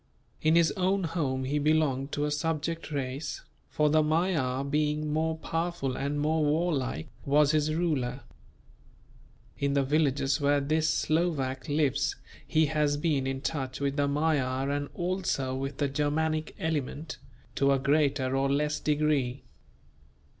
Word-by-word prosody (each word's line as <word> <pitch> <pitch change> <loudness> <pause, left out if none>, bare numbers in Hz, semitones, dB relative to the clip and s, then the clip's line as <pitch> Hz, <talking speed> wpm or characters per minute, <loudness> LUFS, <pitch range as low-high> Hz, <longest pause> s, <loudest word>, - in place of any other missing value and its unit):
In 155 +1 +3
his 170 -2 +4
own 190 +1 0
home 150 -6 -1
he 145 +3 0
belonged 145 -2 +1
to 145 - 0
a 150 - -1
subject 160 +2 -2
race; 140 0 -3 0.3
for 150 - +2
the 155 +1 +4
Magyar 155 -5 +1
being 150 +1 0
more 160 +1 0
powerful 165 -5 -2
and 140 +2 -2
more 155 +1 +1
warlike, 145 - 0 0.2
was 145 +1 +4
his 155 0 +1
ruler. 140 -7 -1 1.4
In 140 0 +1
the 140 -1 +3
villages 140 0 +1
where 145 0 +3
this 155 +3 +1
Slovak 155 -4 0
lives 145 -1 +1 0.3
he 160 0 +3
has 150 -1 +1
been 145 -4 0
in 135 0 -3
touch 135 -4 -3
with 140 0 -1
the 145 -1 +1
Magyar 140 -3 0
and 145 0 -2
also 175 -7 -1
with 135 +1 -4
the 145 - +1
Germanic 155 +3 -1
element, 155 0 -3 0.3
to 140 0 +2
a 135 - +4
greater 140 -1 +1
or 135 0 +1
less 150 +1 0
degree. 145 -4 0
145 Hz, 145 wpm, -28 LUFS, 135-155 Hz, 1.4 s, his